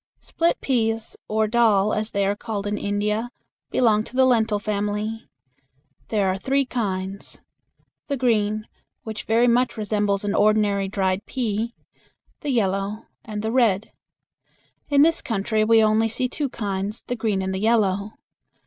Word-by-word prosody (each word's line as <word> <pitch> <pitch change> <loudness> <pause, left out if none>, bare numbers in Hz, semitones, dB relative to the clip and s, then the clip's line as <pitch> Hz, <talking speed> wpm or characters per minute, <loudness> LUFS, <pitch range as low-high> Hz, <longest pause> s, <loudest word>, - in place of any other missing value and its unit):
Split 335 0 0
peas, 225 -4 0
or 220 0 +1
"dal," 215 -3 +3
as 215 +1 -1
they 200 -2 0
are 200 +1 +1
called 205 -2 -5
in 205 0 -1
India, 210 +3 -1 0.4
belong 220 -4 +3
to - - -12
the 260 0 +5
lentil 225 -4 +3
family. 210 +1 -3 0.8
There 205 -3 +1
are 190 0 0
three 275 +6 +1
kinds 195 -5 -4 0.7
the 280 - -1
green, 215 -4 +1 0.4
which 220 -1 -6
very 230 +2 +3
much 245 +1 +2
resembles 205 -2 0
an 205 - 0
ordinary 210 -2 +2
dried 190 0 -1
pea; 230 -2 -2 0.6
the 295 - -4
yellow, 205 -2 -1 0.2
and 210 -1 -5
the 220 - -1
red. 225 -5 +2 1.0
In 285 -1 +5
this 325 +1 +3
country 215 0 0
we 225 0 +5
only 220 +1 +3
see 250 +3 -1
two 280 +2 -3
kinds 205 -2 -4
the 245 - -3
green 215 -4 -1
and 190 0 -2
the 190 - -2
yellow. 210 -2 +1
215 Hz, 150 wpm, -23 LUFS, 205-230 Hz, 1.0 s, the